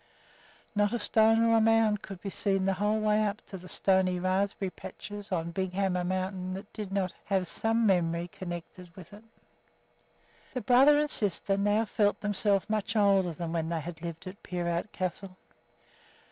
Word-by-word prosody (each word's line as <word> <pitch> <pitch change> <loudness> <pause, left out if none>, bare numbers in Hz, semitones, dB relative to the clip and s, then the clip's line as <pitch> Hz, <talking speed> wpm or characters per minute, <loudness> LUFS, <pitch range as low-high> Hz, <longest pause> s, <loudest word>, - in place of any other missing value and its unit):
Not 205 +1 +1
a - - +1
stone 225 +1 +3
or 230 0 +4
a - - +4
mound 220 -2 +3
could 190 -2 -9
be 195 - -5
seen 195 -1 +1
the 195 - +2
whole 210 +3 0
way 215 0 +2
up 210 0 -1
to 195 - -8
the 180 +1 -12
stony 185 -2 +2
raspberry 190 +1 -1
patches 205 +2 -9
on 170 -2 -1
Big 190 +1 -3
Hammer 185 -2 0
Mountain 185 0 -2
that 200 +2 -10
did 210 -3 -6
not 195 -2 -1
have 190 -3 0
some 225 +4 0
memory 170 -3 +1
connected 175 0 -8
with 185 0 -12
it. 210 +2 -13 1.3
The 250 - -1
brother 270 +4 +6
and 300 0 +2
sister 200 -1 0
now 205 +3 +2
felt 205 -1 +1
themselves 205 -1 +1
much 215 0 -1
older 195 -4 +3
than 165 +1 -5
when 165 -1 -1
they 165 -1 -2
had 160 0 -8
lived 170 -2 -6
at 185 +2 -9
Peerout 175 +2 -3
Castle. 185 +1 -4
195 Hz, 175 wpm, -29 LUFS, 180-210 Hz, 1.3 s, brother